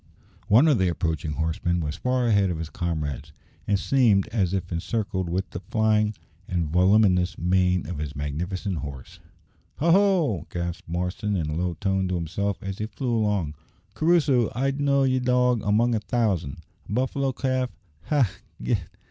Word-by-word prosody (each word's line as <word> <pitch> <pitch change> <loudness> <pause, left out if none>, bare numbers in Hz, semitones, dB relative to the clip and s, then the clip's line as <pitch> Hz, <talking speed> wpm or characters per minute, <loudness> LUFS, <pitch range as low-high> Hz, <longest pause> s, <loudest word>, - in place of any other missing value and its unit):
One 120 +10 +6
of 145 -6 +4
the 95 - +3
approaching 80 -2 -2
horsemen 80 +3 -1
was 75 -1 -3
far 125 +5 0
ahead 100 -4 +3
of 85 - -2
his 80 0 -6
comrades, 75 -4 -3 0.3
and 100 - +3
seemed 105 -2 +3
as 100 -6 0
if 95 -2 -3
encircled 95 +1 -2
with 95 +2 -2
the - - -5
flying 110 +1 +1 0.3
and 85 -3 -1
voluminous 90 +1 +3
mane 90 0 +2
of 85 -3 -5
his 75 -1 -4
magnificent 85 +6 -3
horse. 70 -4 -8 0.6
"Ha! 165 +3 +2
ho!" 175 - +3
gasped 85 -1 -5
Marston 90 +4 -2
in 80 -4 -1
a - - -3
low 90 +1 -1
tone 95 0 0
to 90 - -1
himself, 95 +4 -2
as 95 0 -5
he 105 - -2
flew 120 0 -2
along. 105 -8 0 0.4
"Crusoe! 150 -6 +3
I'd 135 +3 0
know 140 -1 +3
ye, 130 -1 +2
dog, 125 -2 +2
among 110 +4 +2
a 110 - +1
thousand! 105 - -1 0.3
A - - -3
buffalo 130 +3 0
calf! 130 -1 -1 0.4
Ha! 145 -6 +3
95 Hz, 165 wpm, -25 LUFS, 85-120 Hz, 0.6 s, One